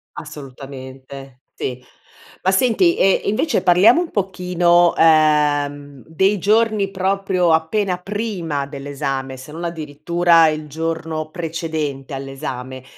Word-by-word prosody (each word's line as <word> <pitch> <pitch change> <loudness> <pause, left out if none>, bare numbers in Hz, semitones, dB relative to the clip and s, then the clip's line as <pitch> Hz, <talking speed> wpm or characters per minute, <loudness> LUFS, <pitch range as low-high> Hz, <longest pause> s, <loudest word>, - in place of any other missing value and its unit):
Assolutamente, 135 -2 -10
sì. 125 0 -5 0.6
Ma 190 - +3
senti, 255 - +3
ehm, 195 0 +3
invece, 275 +9 0
parliamo 200 - +5
un 350 - -5
pochino, 180 -3 +2
ehm, 145 -3 +2
dei 190 +6 +1
giorni 210 0 +1
proprio 190 -2 0
appena 180 +4 0
prima 180 -7 -3
dell'esame, 140 -1 -5
se 130 +3 -11
non 165 +2 -7
addirittura 165 +1 +2
il 155 0 -4
giorno 160 0 -4
precedente 160 -5 -4
all'esame. 135 -1 -6
160 Hz, 105 wpm, -19 LUFS, 140-185 Hz, 0.6 s, parliamo